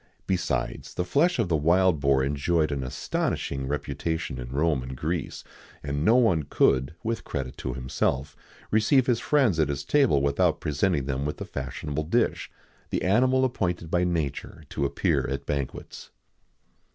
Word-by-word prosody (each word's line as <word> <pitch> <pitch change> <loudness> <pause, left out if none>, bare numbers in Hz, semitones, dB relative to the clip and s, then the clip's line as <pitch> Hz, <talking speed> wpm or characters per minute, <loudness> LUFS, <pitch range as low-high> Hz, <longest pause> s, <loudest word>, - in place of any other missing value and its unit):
Besides, 90 -2 -2
the 90 - -1
flesh 155 - +2
of - - +1
the 85 - +1
wild 85 +2 +3
boar 70 -1 +3
enjoyed 75 +3 +1
an 70 -2 -2
astonishing 65 +1 -2
reputation 75 0 -3
in - - -6
Rome 75 +1 +1
and 65 +1 -7
Greece,[XIX 80 +2 -3 0.4
71] 70 -1 -3
and 70 - -1
no 110 - +5
one 110 -10 +4
could, 70 0 +2
with 115 0 -2
credit 65 -2 -4
to 65 -2 -4
himself, 65 +2 -1 0.4
receive 110 +5 +4
his 120 -3 +2
friends 130 - +2
at 75 -2 +2
his 70 0 -3
table 135 - +3
without 70 0 +2
presenting 75 0 0
them 70 0 -2
with 75 +1 -3
the - - -5
fashionable 75 +3 -4
dish, 115 +9 0 0.4
the - - -1
animal 130 +7 +3
appointed 90 -9 -2
by 90 0 +2
nature 80 -2 -3
to 70 - -1
appear - - 0
at 70 0 -4
banquets. 70 -3 -5
75 Hz, 165 wpm, -26 LUFS, 70-90 Hz, 0.4 s, no